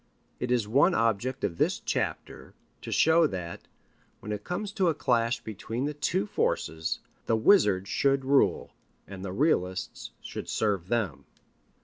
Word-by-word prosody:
It 125 Hz, -, -3 dB
is 120 Hz, -4 st, +1 dB
one 145 Hz, -, +4 dB
object 115 Hz, +4 st, 0 dB
of 85 Hz, -4 st, -2 dB
this -, -, +2 dB
chapter -, -, -4 dB, 0.3 s
to -, -, -7 dB
show 160 Hz, 0 st, +5 dB
that, 90 Hz, -7 st, -6 dB, 0.5 s
when 105 Hz, -, -7 dB
it 105 Hz, -1 st, -4 dB
comes 200 Hz, +3 st, -4 dB
to 195 Hz, -3 st, +1 dB
a 160 Hz, -, 0 dB
clash 115 Hz, -2 st, +1 dB
between 110 Hz, +4 st, -4 dB
the 150 Hz, -, -2 dB
two 120 Hz, -8 st, 0 dB
forces, 80 Hz, -4 st, -1 dB, 0.3 s
the 115 Hz, -, +3 dB
wizards 105 Hz, -, +4 dB
should 135 Hz, -1 st, +2 dB
rule, 140 Hz, +1 st, +2 dB, 0.3 s
and 95 Hz, -1 st, -8 dB
the 95 Hz, -, -4 dB
realists 95 Hz, -, -1 dB
should -, -, -7 dB
serve 100 Hz, -5 st, 0 dB
them. 110 Hz, -8 st, -1 dB
115 Hz, 150 wpm, -28 LUFS, 100-140 Hz, 0.5 s, show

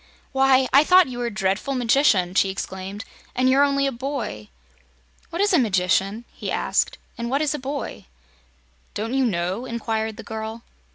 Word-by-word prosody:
"Why, 265 Hz, -1 st, +4 dB
I 280 Hz, +2 st, +7 dB
thought 365 Hz, -1 st, +5 dB
you 245 Hz, -1 st, -6 dB
were 240 Hz, -, -1 dB
a -, -, -4 dB
dreadful 205 Hz, +6 st, -1 dB
magician," 230 Hz, -7 st, +3 dB
she 195 Hz, 0 st, +3 dB
exclaimed, 190 Hz, +1 st, -6 dB, 0.3 s
"and 255 Hz, +1 st, +2 dB
you're 270 Hz, +2 st, +5 dB
only 275 Hz, -1 st, +2 dB
a 275 Hz, -, +1 dB
boy!" 235 Hz, -, -5 dB, 0.8 s
"What 345 Hz, +4 st, -1 dB
is 410 Hz, -, +2 dB
a 340 Hz, -, +5 dB
magician?" 195 Hz, 0 st, +1 dB
he -, -, -6 dB
asked, -, -, 0 dB, 0.2 s
"and 235 Hz, 0 st, -3 dB
what 275 Hz, +4 st, +1 dB
is 300 Hz, -, 0 dB
a 300 Hz, -, -3 dB
boy?" 275 Hz, +2 st, -5 dB, 0.9 s
"Don't 225 Hz, +4 st, -3 dB
you 270 Hz, 0 st, +2 dB
know?" 185 Hz, +2 st, -1 dB
inquired 220 Hz, -2 st, -3 dB
the 225 Hz, -, -8 dB
girl. 220 Hz, +1 st, -6 dB
235 Hz, 175 wpm, -23 LUFS, 205-275 Hz, 0.9 s, I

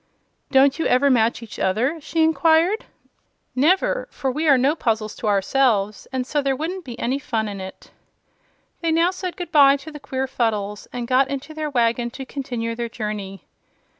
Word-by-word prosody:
"Don't 270 Hz, +2 st, +4 dB
you 325 Hz, -, +1 dB
ever 270 Hz, +3 st, +4 dB
match 235 Hz, -1 st, +2 dB
each 225 Hz, -, -10 dB
other?" 255 Hz, -, 0 dB
she 320 Hz, +2 st, 0 dB
inquired. 325 Hz, -, +3 dB, 0.7 s
"Never; 370 Hz, -, +2 dB
for 265 Hz, -, -3 dB
we 310 Hz, +5 st, -1 dB
are 275 Hz, -3 st, +6 dB
no 275 Hz, +5 st, +2 dB
puzzles 220 Hz, -7 st, -1 dB
to 220 Hz, -, -4 dB
ourselves, 205 Hz, 0 st, +1 dB
and 260 Hz, -1 st, -2 dB
so 295 Hz, +3 st, 0 dB
there 275 Hz, -1 st, 0 dB
wouldn't 350 Hz, +6 st, -4 dB
be 240 Hz, -2 st, -8 dB
any 260 Hz, +4 st, -1 dB
fun 230 Hz, -6 st, -2 dB
in 200 Hz, -2 st, -6 dB
it." 190 Hz, 0 st, -10 dB, 0.9 s
They 330 Hz, -1 st, 0 dB
now 335 Hz, +2 st, +3 dB
said 365 Hz, -1 st, -5 dB
goodbye 285 Hz, -6 st, +5 dB
to 305 Hz, +3 st, -10 dB
the 300 Hz, -, -9 dB
queer 265 Hz, -2 st, -3 dB
Fuddles 210 Hz, -5 st, -2 dB
and 245 Hz, -1 st, -4 dB
got 265 Hz, +2 st, +3 dB
into 280 Hz, +3 st, -5 dB
their 310 Hz, -1 st, -3 dB
wagon 240 Hz, -2 st, +1 dB
to 265 Hz, -, -6 dB
continue 245 Hz, -4 st, -4 dB
their 235 Hz, 0 st, -4 dB
journey. 210 Hz, -4 st, -5 dB
265 Hz, 180 wpm, -22 LUFS, 230-310 Hz, 0.9 s, are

